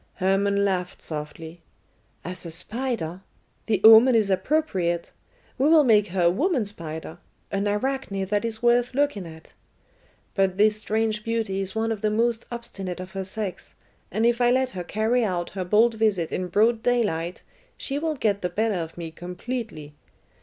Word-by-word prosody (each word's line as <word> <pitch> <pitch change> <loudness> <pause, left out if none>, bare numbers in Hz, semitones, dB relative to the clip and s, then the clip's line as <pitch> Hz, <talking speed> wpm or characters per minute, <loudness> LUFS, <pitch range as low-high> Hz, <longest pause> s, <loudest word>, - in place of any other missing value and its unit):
Hermon 200 +1 +2
laughed 180 -2 -2
softly. 160 +2 -7 0.6
"As 180 0 -5
a 170 - -6
spider? 190 0 -3 0.5
The 210 -4 +1
omen 225 +3 +9
is 210 -3 +3
appropriate. 190 - 0 0.5
We 280 +3 +4
will 315 -2 +7
make 210 -5 +4
her 180 0 -1
a 170 - +6
woman 275 - +1
spider 165 -4 -7 0.3
an 200 +1 0
Arachne 210 -2 -1
that 205 +2 0
is 225 0 -3
worth 240 +1 +3
looking 280 -11 0
at. 160 0 -13 0.8
But 190 -1 +1
this 215 +1 +3
strange 220 0 -1
beauty 220 -4 -1
is 195 +1 -4
one 225 +1 0
of 215 -3 -3
the 215 - +2
most 230 +1 0
obstinate 195 -7 -5
of 185 0 -7
her 195 0 -4
sex, 190 -1 -6 0.3
and 220 +3 0
if 235 +1 +2
I 240 - +5
let 255 +1 +2
her 180 -1 -5
carry 220 +6 +1
out 180 -5 -2
her 190 0 -3
bold 215 +6 +4
visit 210 -7 +1
in 185 - -2
broad 220 +5 +2
daylight 205 -9 0 0.3
she 280 +1 -2
will 315 0 -1
get 205 -6 0
the 180 - -1
better 210 +1 0
of 165 +1 -8
me 165 -2 -6
completely. 180 - -6
205 Hz, 170 wpm, -25 LUFS, 180-230 Hz, 0.8 s, omen